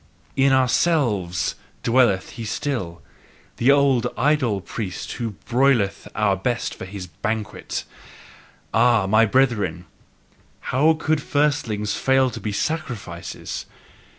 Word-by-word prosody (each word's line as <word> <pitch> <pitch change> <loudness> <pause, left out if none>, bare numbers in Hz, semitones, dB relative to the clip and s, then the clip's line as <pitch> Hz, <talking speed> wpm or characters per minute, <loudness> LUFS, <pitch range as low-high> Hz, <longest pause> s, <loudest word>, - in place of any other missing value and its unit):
IN 135 0 +4
OURSELVES 125 - +2 0.3
dwelleth 115 -6 +3
he 115 - -7
still, 110 -7 -3 0.5
the 125 - +2
old 140 -4 +4
idol 130 -6 +2
priest, 95 0 -5
who 115 -4 -4
broileth 120 -6 +2
our 105 -2 +2
best 115 +5 -2
for - - -8
his 95 0 -7
banquet. 105 +5 -4 0.9
Ah, 120 -5 +4
my 110 +3 +4
brethren, 105 -9 +1 0.9
how 150 +5 +5
could 155 -1 0
firstlings 135 -9 0
fail 130 -1 +2
to - - -7
be 105 - -3
sacrifices! 100 - -4
115 Hz, 110 wpm, -22 LUFS, 100-135 Hz, 0.9 s, how